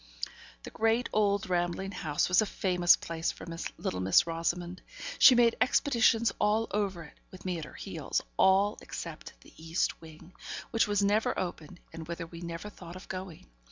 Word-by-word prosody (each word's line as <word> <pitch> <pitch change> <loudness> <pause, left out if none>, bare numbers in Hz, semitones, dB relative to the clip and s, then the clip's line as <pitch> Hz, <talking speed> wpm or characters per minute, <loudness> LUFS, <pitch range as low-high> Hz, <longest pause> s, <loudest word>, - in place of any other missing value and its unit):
The - - -8
great, 225 +3 +1
old 205 -2 +2
rambling 175 +2 -1
house 155 -6 -1
was 180 +2 +4
a 215 - 0
famous 180 -3 +4
place 165 0 -3
for - - -11 0.3
little 90 - -3
Miss 95 - +4
Rosamond. 170 +2 -3 0.4
She 255 - +9
made 235 -1 +4
expeditions 235 -3 +3
all 215 +2 +2
over 195 -4 -1
it, 150 - -16
with 185 - -13
me 180 -2 -2
at 155 - -6
her - - -13
heels; - - -3 0.2
all, 195 +2 +3
except - - -8
the - - -18
east 165 +2 -1
wing, 160 +2 -14 0.4
which 225 -1 +2
was 205 -1 +1
never 205 +2 +2
opened, 175 -1 -5
and 160 -1 -8
whither 170 0 -5
we 170 +1 -11
never 170 +3 -6
thought 175 -3 -11
of 185 - -11
going. 185 -3 -7
185 Hz, 175 wpm, -30 LUFS, 170-210 Hz, 0.4 s, She